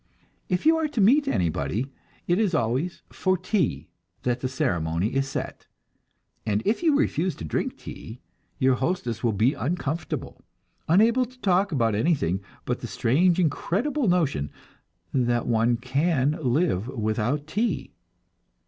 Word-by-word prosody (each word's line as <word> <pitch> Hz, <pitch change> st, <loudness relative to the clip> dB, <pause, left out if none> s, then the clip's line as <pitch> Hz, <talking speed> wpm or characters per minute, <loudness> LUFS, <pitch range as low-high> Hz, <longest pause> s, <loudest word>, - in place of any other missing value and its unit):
If 180 Hz, +7 st, 0 dB
you 320 Hz, +1 st, +6 dB
are 320 Hz, -1 st, +1 dB
to 290 Hz, -, -4 dB
meet 255 Hz, +9 st, +5 dB
anybody, 95 Hz, -, -1 dB, 0.3 s
it 175 Hz, +3 st, +2 dB
is 200 Hz, -6 st, +2 dB
always 130 Hz, +10 st, -1 dB
for 185 Hz, 0 st, +1 dB
"tea" 175 Hz, -, -1 dB, 0.4 s
that 125 Hz, 0 st, 0 dB
the 130 Hz, -, -2 dB
ceremony 85 Hz, -4 st, -1 dB
is 135 Hz, 0 st, 0 dB
set, -, -, -5 dB, 0.8 s
and 105 Hz, -1 st, 0 dB
if 220 Hz, +8 st, +1 dB
you 315 Hz, -5 st, +4 dB
refuse 185 Hz, -, 0 dB
to -, -, -9 dB
drink 75 Hz, -, -2 dB
tea, 115 Hz, +3 st, -9 dB, 0.4 s
your 130 Hz, 0 st, +3 dB
hostess 125 Hz, -, -2 dB
will 115 Hz, -, +3 dB
be 110 Hz, +7 st, +2 dB
uncomfortable, 155 Hz, +3 st, -3 dB, 0.5 s
unable 225 Hz, +9 st, +4 dB
to 255 Hz, +1 st, -18 dB
talk 195 Hz, +1 st, +2 dB
about 115 Hz, -7 st, +1 dB
anything 100 Hz, -, +1 dB, 0.2 s
but -, -, -1 dB
the -, -, -6 dB
strange, 170 Hz, +9 st, +2 dB
incredible 225 Hz, -, 0 dB
notion 155 Hz, -, +1 dB, 0.6 s
that 120 Hz, -2 st, +1 dB
one 115 Hz, 0 st, +2 dB
can 140 Hz, +3 st, +1 dB
live 125 Hz, -, +1 dB
without 120 Hz, +3 st, -1 dB
tea. 210 Hz, +10 st, -2 dB
140 Hz, 140 wpm, -25 LUFS, 115-185 Hz, 0.8 s, you